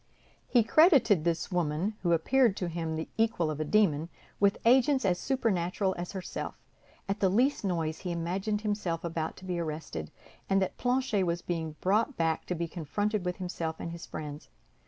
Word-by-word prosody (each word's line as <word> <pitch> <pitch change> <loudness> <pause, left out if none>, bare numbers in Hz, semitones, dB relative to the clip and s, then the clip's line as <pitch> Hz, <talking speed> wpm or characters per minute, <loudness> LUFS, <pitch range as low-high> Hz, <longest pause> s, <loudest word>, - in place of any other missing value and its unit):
He 240 -3 +4
credited 245 - +5
this 170 +3 -1
woman, 175 +3 0
who 175 - +1
appeared 220 +6 +3
to 180 - -2
him 165 -1 -3
the 160 - -3
equal 220 -8 +1
of 150 - -5
a - - +1
demon, 165 -3 +2 0.3
with 200 0 +3
agents 260 +1 +4
as 180 -2 +2
supernatural 195 -7 0
as 175 +2 -5
herself; 190 -2 -5 0.5
at 195 - -2
the 190 - +3
least 250 +9 +2
noise, 165 -5 -1
he 180 - -4
imagined 190 +5 -1
himself 205 -6 -2
about 165 -2 -3
to 185 - -11
be 180 -2 -2
arrested, 150 - -4 0.4
and 195 0 +4
that 190 - -1
Planchet 250 -5 +1
was 170 0 -1
being 160 -3 -3
brought 215 +8 +1
back 165 -1 0
to 180 - -1
be 170 0 -2
confronted 200 +6 -2
with 180 0 -1
himself 170 -3 -3
and 170 - -5
his 170 0 -8
friends. 150 -1 -7
180 Hz, 180 wpm, -30 LUFS, 165-210 Hz, 0.5 s, credited